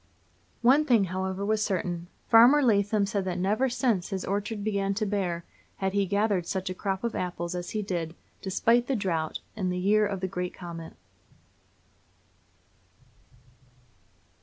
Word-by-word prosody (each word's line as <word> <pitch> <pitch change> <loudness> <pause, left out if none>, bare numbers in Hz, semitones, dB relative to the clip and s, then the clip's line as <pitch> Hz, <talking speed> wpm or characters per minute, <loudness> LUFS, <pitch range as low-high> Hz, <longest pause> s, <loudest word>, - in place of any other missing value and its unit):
One 270 +6 +6
thing, 240 -8 +4
however, 190 +1 -3
was 215 +1 +1
certain: 175 -4 -2 0.2
Farmer 245 +6 +7
Lathem 205 -3 +2
said 200 -2 -1
that 180 -1 -2
never, 210 +8 +1
since 235 -7 0
his 195 -3 -3
orchard 205 +2 -2
began 200 -2 0
to 215 +1 0
bear, 185 -4 -2 0.3
had 190 0 -2
he 200 -1 +1
gathered 200 -3 +1
such 190 -1 -2
a - - -2
crop 195 +1 -3
of 235 - -1
apples 175 -1 -3
as 175 0 -4
he 215 -1 -2
did, 170 -4 -3 0.3
despite 230 +5 +2
the 270 - +1
drought, 170 -7 -2
in 190 -4 -1
the 180 - -2
year 210 +3 +3
of 195 -2 -3
the 190 - 0
great 180 -1 -4
comet. 170 -2 -8
195 Hz, 155 wpm, -28 LUFS, 180-215 Hz, 0.3 s, Farmer